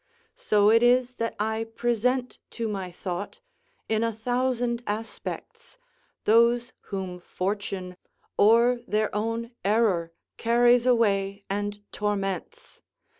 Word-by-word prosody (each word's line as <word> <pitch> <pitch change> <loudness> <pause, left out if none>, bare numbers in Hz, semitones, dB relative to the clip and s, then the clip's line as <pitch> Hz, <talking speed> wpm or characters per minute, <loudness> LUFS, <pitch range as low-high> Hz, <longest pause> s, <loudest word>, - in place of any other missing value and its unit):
So 210 0 +3
it 230 +1 +5
is 250 +1 +3
that 230 0 -2
I 220 +1 -1
present 240 +2 -1 0.2
to 230 -1 -1
my 195 -3 -4
thought, 185 - -5 0.5
in 220 0 +1
a 230 - +1
thousand 245 +1 -1
aspects, 460 - -6 0.5
those 235 +2 +4 0.2
whom 190 -3 -4
fortune 185 0 -4 0.4
or 235 +4 +5
their 215 0 0
own 230 +3 -2
error 195 -6 +2 0.3
carries 240 +1 +4
away 200 -4 +2
and 205 +1 -3
torments. 195 -3 -3
225 Hz, 110 wpm, -26 LUFS, 200-240 Hz, 0.5 s, it